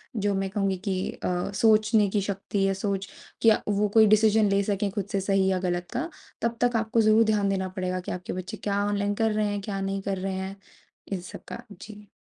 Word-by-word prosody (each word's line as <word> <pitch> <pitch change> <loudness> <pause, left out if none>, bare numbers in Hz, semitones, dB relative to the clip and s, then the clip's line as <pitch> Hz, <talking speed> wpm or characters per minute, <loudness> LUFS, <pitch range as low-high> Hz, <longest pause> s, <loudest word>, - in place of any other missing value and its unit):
जो 205 -2 0
मैं 195 0 -1
कहूँगी 195 -1 0
कि 185 -1 -1
अ, 180 +1 -3
सोचने 215 -1 +4
की 205 0 0
शक्ति 195 0 -2
या 195 - +1
सोच 195 0 -3 0.3
क्या 225 -1 +5
वो 205 0 +2
कोई 220 -1 +7
डिसिज़न 215 -1 +3
ले 200 0 +3
सके 200 0 -1
खुद 195 -1 -3
से 195 - +1
सही 195 0 +2
या 185 - +1
गलत 175 0 -2
का 335 - -2 0.3
तब 235 0 -1
तक 245 -1 +2
आपको 225 +1 +1
ज़रूर 215 +1 +5
ध्यान 200 -1 +1
देना 190 -1 -1
पड़ेगा 185 0 -1
कि 180 - -6
आपके 180 0 -5
बच्चे 185 +4 -6
क्या 200 0 0
ऑनलाइन 205 0 0
कर 225 +1 +1
रहे 210 0 +1
हैं? 205 -1 -2
क्या 195 -1 -4
नहीं 195 0 -2
कर 195 0 -2
रहे 190 0 -2
हैं? 190 +1 -4 0.6
इन 190 - -1
सब 180 - -10
का। 240 - -7 0.2
जी। 210 -1 -11
200 Hz, 225 wpm, -26 LUFS, 195-215 Hz, 0.6 s, कोई